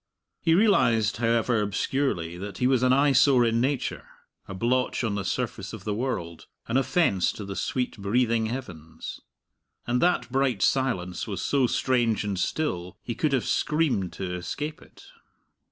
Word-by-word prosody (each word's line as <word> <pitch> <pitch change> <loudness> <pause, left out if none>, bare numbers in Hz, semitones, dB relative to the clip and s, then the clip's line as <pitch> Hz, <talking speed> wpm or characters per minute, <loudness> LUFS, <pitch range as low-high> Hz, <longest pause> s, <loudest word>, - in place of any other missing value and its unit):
He 165 - +3
realized, 115 - +3
however 115 0 +2
obscurely, 105 -4 -1
that 95 +1 -7
he 125 - 0
was 130 -1 +3
an 130 0 +3
eyesore 135 -2 +5
in 115 0 +1
nature, 135 0 -2 0.4
a 95 - -7
blotch 125 +5 0
on 110 -3 0
the 100 -1 -2
surface 90 - -3
of - - -8
the 105 - -2
world, 95 -9 -4 0.2
an 115 - -2
offence 130 - +2
to 105 - -7
the 100 0 -6
sweet 125 +7 -2
breathing 115 +2 +1
heavens. 90 -11 -7 0.6
And 125 +1 0
that 175 -7 +1
bright 130 -6 +1
silence 95 -10 0
was - - -4
so 135 -3 +2
strange 120 -5 +1
and 100 -3 -2
still; 90 - -2
he 120 - -3
could 150 +6 0
have 135 -3 +1
screamed 150 - 0
to 90 -2 -4
escape 145 - -5
it. - - -17
120 Hz, 160 wpm, -26 LUFS, 100-135 Hz, 0.6 s, eyesore